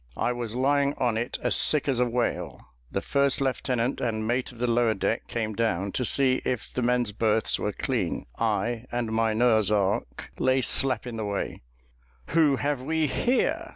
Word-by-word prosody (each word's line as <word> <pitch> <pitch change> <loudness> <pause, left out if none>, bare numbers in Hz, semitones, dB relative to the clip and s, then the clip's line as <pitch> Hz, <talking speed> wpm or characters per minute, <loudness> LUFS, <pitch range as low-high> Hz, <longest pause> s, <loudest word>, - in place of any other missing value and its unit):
I - - +1
was 120 -2 -4
lying 140 +2 +2
on 120 -2 +1
it 120 +3 -2
as - - +1
sick 150 -2 +3
as 130 -3 +1
a 125 - +3
whale 120 +1 -2 0.3
the - - -1
first 140 -1 +1
lieutenant 130 -2 -1
and 110 -2 -1
mate 125 +3 -1
of 120 - -15
the 120 - -1
lower 120 -2 +2
deck 110 +4 -1
came 110 -2 -2
down 100 -3 -1
to 125 - -1
see 130 +1 +3
if 125 -4 -3
the 125 - -1
men's 120 -2 +1
berths 110 +1 +1
were - - -1
clean; - - -2
I, 120 0 -1
and 120 -2 -2
my 110 0 +1
Noah's 110 -2 +3
ark, 100 -1 -1
lay 130 0 +3
slap 135 +1 0
in 120 -2 -6
the 110 - -3
way 100 -1 -3 0.7
'Who 155 -4 +4
have 140 -1 -1
we 160 +3 0
here?' 275 - 0
120 Hz, 190 wpm, -26 LUFS, 110-135 Hz, 0.7 s, Who